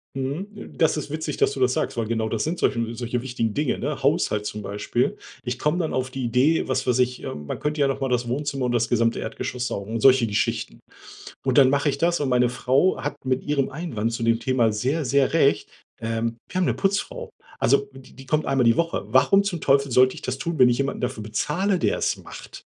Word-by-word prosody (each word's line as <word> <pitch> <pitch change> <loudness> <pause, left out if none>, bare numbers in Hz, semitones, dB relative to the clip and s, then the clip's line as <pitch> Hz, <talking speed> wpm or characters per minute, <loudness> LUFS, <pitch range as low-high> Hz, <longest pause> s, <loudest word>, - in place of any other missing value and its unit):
Mhm, 170 +11 -5
das 160 -1 +2
ist 150 - -5
witzig, 155 -1 -3
dass - - +3
du - - -6
das 125 0 +3
sagst, - - -2
weil 115 - -1
genau 110 -1 -1
das 110 -2 -1
sind 170 +3 -2
solche 115 -2 0
solche 120 0 -3
wichtigen 120 -4 -2
Dinge, 150 -2 0
ne? 140 +1 -3
Haushalt 105 -7 +1
zum 105 0 -4
Beispiel. 105 +5 -1 0.3
Ich 125 0 -4
komme 150 +3 +1
dann 160 - -1
auf 130 0 -1
die 130 0 -5
Idee, 130 +7 +2
was 130 0 -1
weiß 125 0 +2
ich, 125 0 0
äh: - - -4
„Man 75 0 -6
könnte 150 0 -2
ja 140 - +4
nochmal 135 0 -2
das 125 -1 0
Wohnzimmer 140 +1 -2
und 125 - 0
das 120 -1 +1
gesamte 115 -1 +1
Erdgeschoss 125 0 -4
saugen“, 110 +3 -4
solche 130 0 +5
Geschichten. 100 -1 -2 0.7
Und 130 0 +1
dann 135 -2 +7
mache 140 +2 +2
ich 140 - -2
das 170 +3 +1
und 145 -3 -1
meine 125 -1 +3
Frau 130 +8 +2
hat 145 0 -3
mit 130 0 0
ihrem 145 -2 0
Einwand 120 -8 -3
zu 115 - -3
dem 115 0 +2
Thema 120 -2 +2
sehr, 130 +8 -1
sehr 140 +2 +2
recht, 145 -4 +2 0.3
ähm: 115 +1 -2
„Wir 185 - -4
haben - - +2
'ne - - +1
Putzfrau.“ 200 0 -2 0.3
Also 140 +3 +2
die 135 -1 -15
die 135 - -12
kommt 155 +3 0
einmal 135 -3 +2
die 115 0 +4
Woche. 165 -10 0
Warum 135 - +4
zum 180 -6 -3
Teufel 140 -1 +2
sollte 130 +1 +4
ich - - -10
das 130 +1 -3
tun, 170 +3 -3
wenn 125 -1 +7
ich 120 - +1
jemanden 140 +1 -2
dafür 120 -4 -3
bezahle, 170 - -1
der - - +1
es - - 0
macht? - - -11
130 Hz, 230 wpm, -24 LUFS, 120-145 Hz, 0.7 s, dann